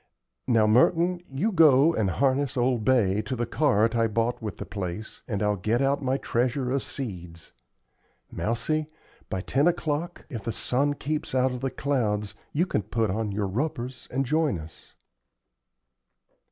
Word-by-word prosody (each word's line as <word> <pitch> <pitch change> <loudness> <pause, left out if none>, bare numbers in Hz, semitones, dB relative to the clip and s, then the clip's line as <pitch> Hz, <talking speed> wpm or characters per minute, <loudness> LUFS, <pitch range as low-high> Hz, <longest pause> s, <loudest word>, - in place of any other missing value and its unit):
Now, 115 -2 +4
Merton, 170 +11 +3
you 150 +12 0
go 160 -3 +6
and 105 -8 +1
harness 135 +6 +1
old 120 -2 +1
Bay 105 -5 +3
to 110 +5 -4
the 120 0 -1
cart 115 -4 +2
I 115 -1 +3
bought 115 +3 -1
with 105 -2 -5
the - - -6
place, 100 +2 -6
and 105 -4 -2
I'll 105 0 +1
get 110 +6 0
out 140 +1 +1
my 130 0 0
treasure 125 +1 -1
of 135 0 +1
seeds. 90 - -6 0.8
Mousie, 150 +7 -1 0.4
by 95 - -2
ten 140 - +2
o'clock, 170 0 -1
if 120 -8 -6
the 115 - -3
sun 140 +6 0
keeps 150 -1 -3
out 130 0 +3
of 125 -1 -5
the 135 - 0
clouds, 110 -8 -1 0.2
you 165 +5 +1
can 140 - 0
put 110 +1 -1
on 110 +1 -2
your 100 +1 -1
rubbers 125 +3 -3
and 135 +2 -1
join 155 - +1
us." 80 0 -12
125 Hz, 165 wpm, -26 LUFS, 105-140 Hz, 0.8 s, go